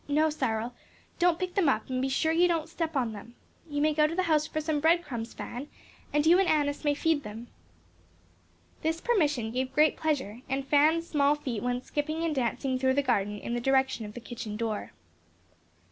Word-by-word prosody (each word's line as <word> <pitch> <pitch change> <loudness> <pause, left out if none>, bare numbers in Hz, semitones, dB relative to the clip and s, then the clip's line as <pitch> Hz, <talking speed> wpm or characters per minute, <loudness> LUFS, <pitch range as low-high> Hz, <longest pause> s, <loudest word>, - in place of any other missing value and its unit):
No, 305 +2 +2
Cyril, 240 -4 -2 0.5
don't 350 -1 +3
pick 365 0 -3
them 365 -7 +3
up, - - 0
and 255 -1 -2
be 265 - 0
sure 315 +4 +1
you 345 +2 +4
don't 330 -2 0
step 330 -1 -3
on 240 -5 0
them. 225 +3 -11 0.3
You 290 0 -1
may 310 0 +3
go 300 0 +4
to 325 - -4
the 370 - +1
house 310 -3 +2
for 310 - -3
some 310 -1 -1
bread 335 +3 +3
crumbs, 230 -5 -6
Fan, 255 +4 -6 0.4
and 295 +1 +2
you 345 +3 +6
and 385 - +3
Annis 290 -1 +1
may 290 -1 +2
feed 320 0 +1
them." 225 0 -9 1.3
This 320 +1 0
permission 295 - +1
gave 255 +2 -2
great 305 0 +4
pleasure, 265 -8 -2
and 270 +1 -1
Fan's 305 +4 +3
small 290 -2 +3
feet 255 -7 -4
went 245 0 -2
skipping 310 +2 -2
and 330 -2 0
dancing 260 0 -1
through 260 0 +2
the 285 - +2
garden 210 -5 0
in 235 - -5
the 240 - -1
direction 265 -2 +2
of 210 - -11
the - - -5
kitchen 225 -3 -6
door. 220 -2 -3
290 Hz, 205 wpm, -28 LUFS, 245-315 Hz, 1.3 s, you